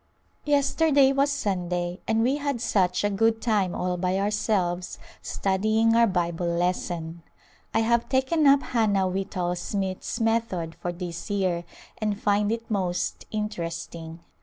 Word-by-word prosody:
Yesterday 285 -1 +3
was 275 +1 +2
Sunday, 180 -7 -2
and 225 0 +2
we 265 +4 +2
had 285 -4 -2
such 185 -6 +1
a 205 - +2
good 225 +3 +2
time 205 -6 +1
all 180 0 -1
by 185 +1 0
ourselves 195 -3 0 0.2
studying 215 +4 +1
our 235 0 +5
Bible 175 -2 -1
lesson. 170 -1 -2 0.5
I - - +2
have 235 +1 +1
taken 280 +4 +2
up 275 0 +6
Hannah 205 -5 +1
Whitall 185 -1 -2
Smith's 190 +4 -3
method 225 -8 0
for 175 - -4
this 175 +2 -6
year 185 -4 0 0.3
and 210 -2 -1
find 205 +1 +2
it 230 0 -3
most 185 -4 -2
interesting. 170 -5 -5
200 Hz, 135 wpm, -26 LUFS, 180-225 Hz, 0.5 s, up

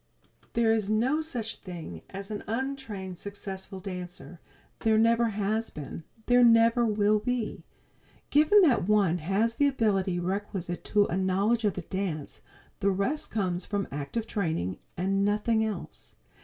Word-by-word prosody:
There 230 -1 +3
is 215 -2 0
no 250 +8 +2
such 240 -8 -4
thing 165 - -8
as 195 +2 -7
an 210 - -4
untrained 225 -7 -4
successful 195 -1 -7
dancer; 180 -4 -7 0.4
there 220 -1 +3
never 230 +1 +4
has 215 +2 -1
been; 150 +2 -8 0.2
there 245 0 +5
never 230 0 +5
will 210 0 +3
be. 245 0 -3 0.7
Given 310 +8 +6
that 250 - +3
one 200 -5 +3
has 195 +8 +1
the 285 +4 +3
ability 195 -9 +1
requisite 185 -1 -3
to 205 -1 +3
a 175 - -2
knowledge 195 +5 +1
of 205 - +1
the 185 - -5
dance, 175 -6 -4 0.4
the 200 - +2
rest 200 +11 -1
comes 185 -4 -1
from 200 -2 -2
active 145 - -3
training, 160 - -2 0.2
and 195 +3 +1
nothing 215 +2 +2
else. 215 -2 -6
205 Hz, 145 wpm, -28 LUFS, 185-230 Hz, 0.7 s, Given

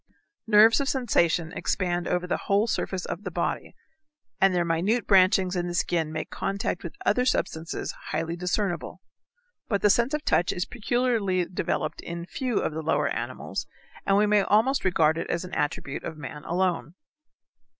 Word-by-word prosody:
Nerves 220 +4 +6
of 275 - -1
sensation 175 - +1
expand 175 -3 -1
over 180 0 0
the 180 - -3
whole 200 +2 +3
surface 190 -5 -2
of 175 - -5
the 185 - -3
body, 170 0 -3 0.6
and 195 0 +5
their 175 -1 +1
minute 185 +9 +1
branchings 185 -1 +4
in 175 0 -1
the 175 - -4
skin 165 -3 0
make 155 0 -5
contact 195 -1 -2
with 170 - -7
other 250 +4 +3
substances 165 -10 -1 0.2
highly 165 +2 -2
discernible. 180 +1 -2 0.6
But 200 -4 -1
the 210 - +6
sense 240 +7 +2
of 300 - -5
touch 175 - +2
is 180 - -2
peculiarly 230 -6 0
developed 180 - -2
in 170 0 -6
few 245 +4 -2
of - - -2
the 160 - -3
lower 160 +1 +1
animals, - - -4 0.4
and 195 - +3
we 210 - +4
may 210 0 +4
almost 225 +8 +2
regard 165 -3 +3
it - - -4
as 175 +1 -1
an 180 - -10
attribute 145 -2 -2
of 155 - -6
man 150 +1 -8
alone. 180 -1 -1
185 Hz, 170 wpm, -26 LUFS, 170-210 Hz, 0.6 s, Nerves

